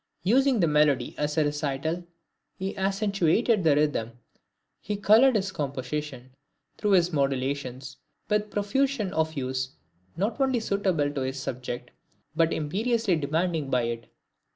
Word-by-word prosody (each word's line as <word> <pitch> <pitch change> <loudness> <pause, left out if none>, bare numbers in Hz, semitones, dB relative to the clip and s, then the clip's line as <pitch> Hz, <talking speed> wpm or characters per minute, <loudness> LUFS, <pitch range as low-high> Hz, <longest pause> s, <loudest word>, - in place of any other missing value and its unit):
Using 255 +5 +3
the 170 - +4
melody 150 -4 +2
as 150 +1 -1
a 155 - +4
recital, 145 +3 -2 0.5
he 190 +1 -4
accentuated 195 +1 +1
the 155 -3 +4
rhythm, 145 -6 0 0.7
he 210 - -3
colored 225 +6 +5
his 195 -2 0
composition, 140 -2 -4 0.5
through 210 -2 +2
his 180 -2 +3
modulations, 135 -1 -2 0.3
with 210 0 +2
a - - -12
profusion 210 +1 -1
of 160 0 +1
hues 130 - -3 0.4
not 215 +8 -1
only 260 -2 +2
suitable 190 -9 0
to 140 -2 -3
his 130 +1 -3
subject, 125 -1 -5 0.4
but 165 0 +3
imperiously 210 +6 0
demanded 160 0 -1
by 125 -2 +2
it. 115 -1 -4
160 Hz, 135 wpm, -27 LUFS, 135-200 Hz, 0.7 s, colored